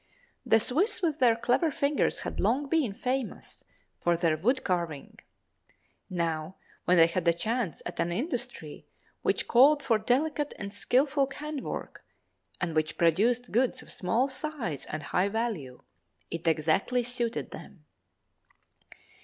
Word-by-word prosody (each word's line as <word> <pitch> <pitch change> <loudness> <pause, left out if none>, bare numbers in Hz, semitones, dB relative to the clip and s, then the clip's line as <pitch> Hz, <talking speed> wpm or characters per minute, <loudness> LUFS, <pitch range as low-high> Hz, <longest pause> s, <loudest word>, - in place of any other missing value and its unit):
The 225 - +6
Swiss 355 - +1
with 315 -3 0
their 240 -3 +5
clever 245 +8 +2
fingers 285 0 0
had - - -5
long 280 +2 +1
been 290 -7 +1
famous 250 +4 -4 0.4
for 170 -1 +2
their 165 -2 +2
wood 245 - +1
carving; 170 -6 -3 0.9
now, 165 -1 -2 0.3
when 180 - +4
they 165 - +8
had 170 +1 -2
a 170 - +6
chance 215 - -2
at - - -6
an 170 - 0
industry 240 - -4 0.3
which - - 0
called 285 +5 +6
for 225 -3 +2
delicate 290 +6 0
and 200 0 -6
skilful 270 +6 +2
hand 300 -1 -5
work - - -6 0.6
and 170 -3 -2
which 155 0 0
produced 220 +9 +2
goods 245 +3 +1
of - - -11
small 225 +9 +1
size 265 - -4
and 155 0 -5
high 180 +6 +1
value, 200 - -3 0.5
it 165 0 -4
exactly 180 +10 +2
suited 240 -1 -2
them. 165 -7 -11
225 Hz, 140 wpm, -29 LUFS, 170-265 Hz, 0.9 s, they